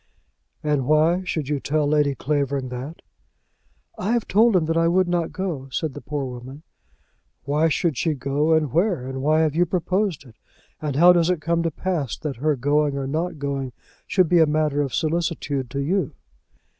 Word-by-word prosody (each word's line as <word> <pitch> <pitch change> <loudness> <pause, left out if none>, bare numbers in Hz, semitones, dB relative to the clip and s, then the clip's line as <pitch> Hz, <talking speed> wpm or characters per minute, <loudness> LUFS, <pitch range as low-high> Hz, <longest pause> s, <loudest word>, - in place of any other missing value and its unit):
"And 145 -4 0
why 160 +4 +3
should 160 -5 -2
you 145 -1 -1
tell 150 +2 0
Lady 145 -2 +2
Clavering 140 -2 -1
that?" 130 +6 -7 1.0
"I 210 +5 0
have 235 -2 0
told 220 +2 +4
him 170 -3 +3
that 165 +1 -1
I 165 0 +3
would 185 +2 +3
not 175 -2 -1
go," 165 -8 -4
said 150 +2 -3
the 145 - -8
poor 145 -2 -3
woman. 130 +4 -9 0.8
"Why 150 +4 +2
should 160 -1 0
she 160 +2 0
go, 145 +4 0
and 155 -4 +2
where; 170 - +1
and 130 0 -5
why 155 +3 +3
have 155 -2 +1
you 175 +3 +2
proposed 185 -2 -1
it? 115 -4 -17 0.4
And 150 -3 -2
how 175 +4 +7
does 170 -1 +2
it 180 -3 +1
come 170 +2 0
to 165 - 0
pass 165 -5 -3
that 150 -5 -5
her 150 +4 +1
going 145 +2 +1
or 135 - -2
not 160 +4 -2
going 140 -3 -3 0.3
should 185 -3 +3
be 175 +1 +4
a 160 - +5
matter 150 -1 +1
of 135 -3 -2
solicitude 155 -5 -1
to 140 - -4
you?" 160 +2 -1
155 Hz, 195 wpm, -23 LUFS, 140-170 Hz, 1.0 s, how